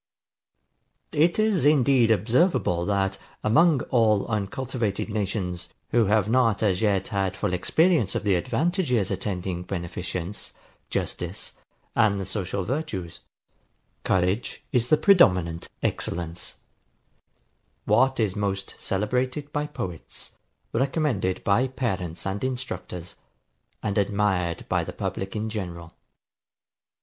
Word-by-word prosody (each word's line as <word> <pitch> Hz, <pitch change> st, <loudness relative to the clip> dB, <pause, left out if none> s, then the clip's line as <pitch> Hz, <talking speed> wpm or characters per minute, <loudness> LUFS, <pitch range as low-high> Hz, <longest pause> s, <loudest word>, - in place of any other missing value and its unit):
It 165 Hz, +4 st, +3 dB
is 215 Hz, -7 st, +2 dB
indeed 135 Hz, -5 st, +4 dB
observable, 110 Hz, -, +2 dB
that, 95 Hz, -1 st, 0 dB, 0.2 s
among 150 Hz, +5 st, +4 dB
all 110 Hz, -4 st, +3 dB
uncultivated 110 Hz, 0 st, -2 dB
nations, 100 Hz, -4 st, -3 dB, 0.2 s
who 115 Hz, -1 st, +3 dB
have 105 Hz, 0 st, +3 dB
not 115 Hz, -3 st, +3 dB
as 100 Hz, -2 st, +2 dB
yet 100 Hz, -3 st, +1 dB
had 95 Hz, -2 st, -1 dB
full 90 Hz, -, -1 dB
experience 155 Hz, -, +2 dB
of -, -, -1 dB
the 100 Hz, -2 st, +3 dB
advantages 125 Hz, -, +1 dB
attending 90 Hz, -3 st, -2 dB
beneficence, 90 Hz, +1 st, -5 dB, 0.4 s
justice, -, -, -3 dB, 0.4 s
and 105 Hz, -4 st, +3 dB
the 95 Hz, -, -3 dB
social 95 Hz, -1 st, -2 dB
virtues, 110 Hz, -, -3 dB, 0.8 s
courage 95 Hz, +5 st, 0 dB
is 120 Hz, -1 st, +2 dB
the 155 Hz, -, +5 dB
predominant 90 Hz, -, +4 dB
excellence; 85 Hz, +1 st, -2 dB, 1.3 s
what 130 Hz, +5 st, +3 dB
is 105 Hz, -4 st, +1 dB
most 100 Hz, -1 st, -2 dB
celebrated 125 Hz, +8 st, -1 dB
by 145 Hz, 0 st, -1 dB
poets, 90 Hz, -, -7 dB, 0.4 s
recommended 130 Hz, -, 0 dB
by 115 Hz, +6 st, +3 dB
parents 95 Hz, -10 st, -3 dB
and 95 Hz, +1 st, -3 dB
instructors, 95 Hz, -9 st, -4 dB, 0.7 s
and 105 Hz, -1 st, 0 dB
admired 100 Hz, -4 st, 0 dB
by -, -, +1 dB
the -, -, -6 dB
public 95 Hz, +2 st, -4 dB
in 110 Hz, +1 st, -2 dB
general. 85 Hz, -6 st, -6 dB
105 Hz, 110 wpm, -25 LUFS, 95-130 Hz, 1.3 s, the